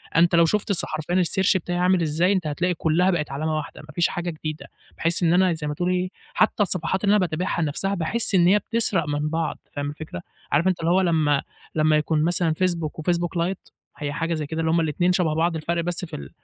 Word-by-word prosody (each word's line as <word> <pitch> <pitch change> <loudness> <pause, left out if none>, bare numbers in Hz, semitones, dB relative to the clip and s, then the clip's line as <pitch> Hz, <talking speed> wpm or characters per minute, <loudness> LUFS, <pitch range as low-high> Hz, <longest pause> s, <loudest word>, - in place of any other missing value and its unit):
أنت 170 +1 +4
لو 170 - +6
شُفت 210 +6 0
الص 200 - +2
حرفيًا 155 +3 -3
الsearch 190 +2 +2
بتاعي 175 0 -3
عامل 180 0 +3
إزاي 165 +4 +2
أنت 180 -5 -1
هتلاقي 175 +5 0
كلها 175 +3 +2
بقت 150 -5 -2
علامة 155 +3 -2
واحدة 155 - -6
ما 150 - -15
فيش 170 +1 +2
حاجة 175 0 -3
جديدة. 155 -1 -6 0.3
باحس 165 +2 0
إن 165 - +4
أنا 180 -1 +4
زي 155 -2 -5
ما 150 - -2
تقول 175 +4 -1
إيه 180 0 0 0.2
حتى 215 -1 +2
الصفحات 190 +1 -1
اللي 205 +1 +4
أنا - - +4
باتابعها 175 -1 -1
نفسها 165 +6 -1
باحس 195 +4 0
إن 175 -1 +5
هي 205 +3 +5
بتسرق 215 -8 0
من 150 +1 -1
بعض 165 +1 -2 0.2
فاهم 145 0 -3
الفكرة، 150 - -7 0.3
عارف 155 +6 +3
أنت 185 -2 +1
اللي 165 +1 +1
هو 190 - +4
لما 155 -5 +2 0.3
لما 155 0 +3
يكون 155 0 +1
مثلًا 170 -1 +1
فيسبوك 170 -3 -1
وفيسبوك 175 +1 -1
لايت 175 +3 -2 0.3
هي 145 -1 -3
حاجة 165 +1 -1
زي 155 -2 -2
كده 160 +3 -5
اللي 160 - +1
هُم 170 - +3
الاتنين 165 +3 +1
شبه 175 -4 +1
بعض 165 +1 +1
الفَرْق 170 +2 -1
بس 175 +1 -3
في 160 - -8
ال - - -8
170 Hz, 235 wpm, -24 LUFS, 155-180 Hz, 0.3 s, لو